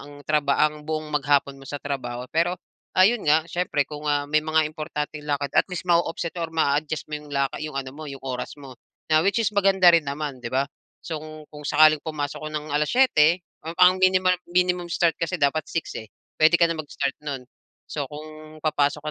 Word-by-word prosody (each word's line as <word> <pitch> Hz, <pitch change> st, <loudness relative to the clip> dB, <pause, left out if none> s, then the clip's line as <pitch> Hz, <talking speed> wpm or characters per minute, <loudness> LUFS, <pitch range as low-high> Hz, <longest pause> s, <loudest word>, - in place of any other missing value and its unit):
ang 145 Hz, -, -12 dB, 0.2 s
traba 145 Hz, -2 st, +2 dB
ang 150 Hz, 0 st, -12 dB
buong 155 Hz, -1 st, -2 dB
maghapon 140 Hz, -1 st, +1 dB
mo -, -, -12 dB
sa 145 Hz, -, -4 dB
trabaho. 125 Hz, -3 st, -4 dB
Pero 170 Hz, +2 st, +2 dB, 0.4 s
ayun 205 Hz, +5 st, +5 dB
nga, 155 Hz, +1 st, +4 dB
siyempre 175 Hz, -5 st, 0 dB
kung, 150 Hz, 0 st, -6 dB
ah, 145 Hz, 0 st, +1 dB
may 155 Hz, +1 st, +2 dB
mga 155 Hz, 0 st, +2 dB
importanteng 150 Hz, -1 st, -5 dB
lakad 140 Hz, -1 st, -1 dB
at -, -, +4 dB
least 180 Hz, 0 st, -4 dB
ma-o-offset 170 Hz, 0 st, +1 dB
or 165 Hz, -, -2 dB
maa-adjust 155 Hz, -1 st, 0 dB
mo -, -, -3 dB
'yong 150 Hz, -, -14 dB
la 140 Hz, -1 st, +1 dB, 0.2 s
'yung 155 Hz, -2 st, -5 dB
ano 135 Hz, -1 st, -3 dB
mo, 155 Hz, +1 st, -8 dB
'yung 135 Hz, -1 st, -9 dB
oras 130 Hz, +2 st, -4 dB
mo 135 Hz, -2 st, -10 dB, 0.4 s
na 155 Hz, -, +6 dB
which 200 Hz, +3 st, +2 dB
is 220 Hz, -, +1 dB
maganda 195 Hz, -2 st, +5 dB
rin 165 Hz, -2 st, +4 dB
naman, 140 Hz, -2 st, -4 dB
'di -, -, -4 dB
ba? 135 Hz, +2 st, +2 dB, 0.4 s
So, 165 Hz, -, -4 dB
kung 155 Hz, -1 st, -10 dB
kung 150 Hz, 0 st, -10 dB
sakaling 155 Hz, 0 st, +6 dB
pumasok 145 Hz, -3 st, -4 dB
ka -, -, -11 dB
ng 150 Hz, 0 st, -4 dB
7:00, 165 Hz, -, +4 dB, 0.3 s
ang 165 Hz, +1 st, -5 dB
pang 180 Hz, 0 st, +7 dB
minimal 185 Hz, -1 st, +4 dB, 0.2 s
minimum 180 Hz, 0 st, +1 dB
start 170 Hz, -1 st, +2 dB
kasi 165 Hz, +2 st, -2 dB
dapat 145 Hz, +2 st, +2 dB
6, 165 Hz, -, -3 dB
eh, 110 Hz, -, -10 dB, 0.3 s
puwede 160 Hz, +2 st, +6 dB
ka 170 Hz, -, +7 dB
na 165 Hz, -, -1 dB
mag-start 140 Hz, -2 st, -3 dB
no'n. 135 Hz, -3 st, -4 dB, 0.4 s
So, 145 Hz, -2 st, -3 dB
kung 155 Hz, +1 st, -10 dB
papasok 150 Hz, -1 st, 0 dB
155 Hz, 205 wpm, -24 LUFS, 145-165 Hz, 0.4 s, pang